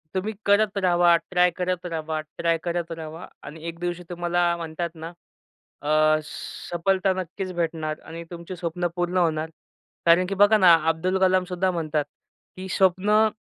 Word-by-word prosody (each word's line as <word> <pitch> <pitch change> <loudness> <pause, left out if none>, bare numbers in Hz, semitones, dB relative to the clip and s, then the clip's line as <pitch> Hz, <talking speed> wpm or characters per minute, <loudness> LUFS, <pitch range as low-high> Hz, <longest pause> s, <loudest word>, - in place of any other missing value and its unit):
तुम्ही 210 +4 -1
करत 205 0 +3
रहावा, 175 -2 +4 0.2
ट्राय 180 0 +4
करत 180 -1 -2
रहावा, 160 -2 -3 0.2
ट्राय 165 -1 +1
करत 170 -1 -2
रहावा 160 +1 -7 0.2
आणि 155 +2 -10
एक 170 0 -6
दिवशी 175 0 -3
तुम्हाला 175 0 0
म्हणतात 170 +1 -4
ना 165 +1 -7 0.7
अ, 155 0 +4
सफलता 190 +5 -2
नक्कीच 185 +1 -5
भेटणार 160 -2 -2
आणि 165 +1 -8
तुमची 170 +2 -7
स्वप्नं 175 0 -2
पूर्ण 175 +1 -1
होणार. 160 -2 +1 0.6
कारण 170 +2 +5
की 195 - -2
बघा 205 +2 +6
ना, 180 -4 +7 0.2
अब्दुल 185 +4 0
कलाम 185 -1 +3
सुद्धा 185 +1 0
म्हणतात 155 -3 -1 0.5
की 190 0 -6
स्वप्नं 205 +4 +3
175 Hz, 150 wpm, -24 LUFS, 165-185 Hz, 0.7 s, ना